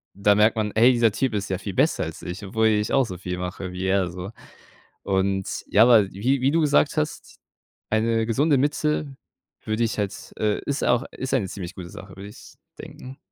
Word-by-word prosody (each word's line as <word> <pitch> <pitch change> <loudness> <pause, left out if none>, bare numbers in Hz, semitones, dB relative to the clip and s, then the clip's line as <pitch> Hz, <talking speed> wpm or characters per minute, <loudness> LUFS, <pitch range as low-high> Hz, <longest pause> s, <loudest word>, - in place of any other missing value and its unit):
da 100 +1 +3
merkt 105 +2 +4
man: 105 -1 -1
„Hey, 120 +3 +6
dieser 115 -3 +3
Typ 125 +2 -1
ist 100 -1 -3
ja 95 - -1
viel 100 -1 -6
besser - - +2
als - - -8
ich, 95 +3 -6
obwohl 110 +3 +1
ich 105 -1 +1
auch 135 -2 +4
so 90 -5 -7
viel 90 0 -5
mache 90 +1 -5
wie 95 +1 -4
er 95 -2 +1
so.“ 90 +4 -7 0.7
Und, 95 0 -1
ja, 105 - +5
aber 110 -5 +5
wie 125 +8 0
wie 135 - +3
du 165 - +3
gesagt 150 0 +2
hast, 155 0 -3 0.5
eine 115 +1 +1
gesunde 140 +6 +2
Mitte 145 0 -1 0.5
würde 110 +2 -1
ich 110 - -2
halt 100 -2 -4
äh, 105 -1 0
ist 140 0 -1
auch 120 +2 +2
ist 130 0 -4
eine 100 -8 0
ziemlich 90 -1 -7
gute 90 -2 -9
Sache, 95 - -11
würde 100 +1 -9
ich 105 - -14 0.2
denken. 130 +1 -10
110 Hz, 205 wpm, -24 LUFS, 95-130 Hz, 0.7 s, Hey